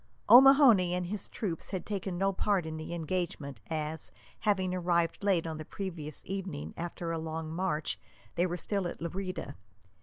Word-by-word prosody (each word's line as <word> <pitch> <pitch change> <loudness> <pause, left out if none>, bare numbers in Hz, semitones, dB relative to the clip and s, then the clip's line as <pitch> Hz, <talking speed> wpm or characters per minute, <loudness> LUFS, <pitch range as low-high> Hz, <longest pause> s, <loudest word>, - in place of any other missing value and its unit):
O'Mahony 245 -9 +8
and 180 0 -1
his 200 +2 -4
troops 175 -7 -3
had 190 -3 -4
taken 195 -3 -3
no 195 +1 +2
part 195 -2 +1
in 160 0 -5
the 155 +1 -6
engagement, 165 -4 -3
as, 155 0 -3 0.3
having 190 -4 +1
arrived 170 0 +1
late 190 -5 +2
on 160 -1 -4
the - - -4
previous 165 -4 -6
evening 185 -6 -4
after 170 0 -4
a 165 - -1
long 160 0 -4
march, 165 -4 -1 0.3
they 175 +2 +2
were 175 0 -3
still 195 +1 -1
at - - -6
Lerida. 185 +2 -4
175 Hz, 170 wpm, -31 LUFS, 160-195 Hz, 0.3 s, O'Mahony